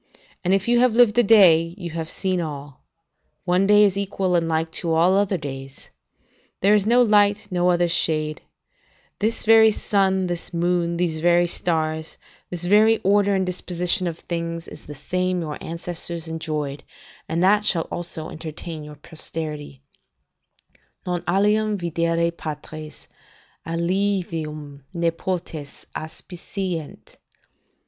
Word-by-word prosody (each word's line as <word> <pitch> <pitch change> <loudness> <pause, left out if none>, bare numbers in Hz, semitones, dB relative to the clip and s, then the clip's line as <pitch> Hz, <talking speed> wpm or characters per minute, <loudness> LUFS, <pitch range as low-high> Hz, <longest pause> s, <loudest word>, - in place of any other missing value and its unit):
And, 180 - +1
if 195 +1 +2
you 240 0 +4
have 245 -2 +3
lived 235 -3 +5
a - - +8
day, 175 -6 +5
you 175 -4 -6
have 165 0 -4
seen 185 0 -1
all: 145 -4 -7 0.6
one 180 +2 +2
day 210 0 +6
is 200 -2 +3
equal 195 -2 -1
and 165 -1 +1
like 160 0 -1
to 165 0 -2
all 170 +3 +4
other 200 -1 +2
days. 135 -3 -9 0.7
There 200 +2 +5
is 210 -1 +2
no 240 +2 +5
other 240 - +3
light, 205 0 +3
no 180 0 +2
other 175 0 +3
shade; 155 -3 0 0.8
this 220 +2 -1
very 220 0 +7
sun, 190 -3 +1
this 175 0 -5
moon, 170 0 0
these 170 -3 -1
very 175 +1 +4
stars, 160 -2 -2 0.3
this 175 -1 -6
very 215 +4 +5
order 200 +1 +3
and 190 -1 +1
disposition 180 0 0
of 165 -1 -4
things, 170 -1 -5
is - - -12
the 150 - -8
same 180 +5 -1
your 155 -2 -6
ancestors 170 0 -3
enjoyed, 150 -3 -4 0.5
and 165 +2 0
that 205 +2 +4
shall 170 -5 +1
also 165 -2 -5
entertain 160 0 -7
your 150 0 -10
posterity: 150 -2 -7 1.2
"'Non 180 -1 -2
alium 210 +3 +2
videre 170 -1 0
patres, 155 -1 -8 0.6
aliumve 165 -5 -2
nepotes 170 -3 -3
Aspicient. 175 +1 -6
175 Hz, 140 wpm, -23 LUFS, 160-195 Hz, 1.2 s, a